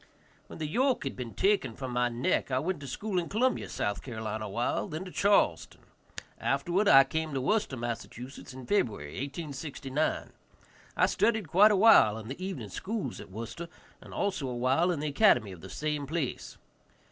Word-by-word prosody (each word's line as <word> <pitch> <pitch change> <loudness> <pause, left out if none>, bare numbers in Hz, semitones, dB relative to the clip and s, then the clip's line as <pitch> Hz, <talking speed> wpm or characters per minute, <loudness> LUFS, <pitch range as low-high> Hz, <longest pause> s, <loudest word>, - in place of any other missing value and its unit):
When - - -10
the 155 - -3
yoke 255 - +1
had 135 - -4
been 120 -3 -7
taken 195 - +1
from 130 -2 -5
my 120 0 +1
neck 120 +3 0
I 130 - 0
went 165 +4 -1
to 140 - -8
school 195 - -2
in 170 - -4
Columbia, 250 +5 +1
S.C., 105 +5 -3
awhile, 110 0 -2
then 160 +4 -5
to 180 - -8
Charleston. 195 - +2 0.6
Afterward 175 +9 +1
I 135 -5 +9
came 160 +1 -3
to - - +1
Worcester, 205 -4 0
Mass., 120 -1 -3
in 130 +1 -10
February, 105 - 0
1869. 140 - -3 0.7
I - - +5
studied 220 -6 +1
quite 205 +7 +6
a - - +4
while 195 - +6
in 110 0 -8
the 140 +8 -6
evening 160 - -5
schools 205 - -4
at - - -12
Worcester, 115 - -7 0.3
and - - -13
also 185 -9 -2
a 125 -1 -4
while 130 +8 +2
in 165 -5 -1
the 155 - -2
academy 140 - +4
of 90 -3 -11
the 95 - -10
same 150 +6 -3
place. 155 -4 -3
140 Hz, 180 wpm, -29 LUFS, 120-185 Hz, 0.7 s, I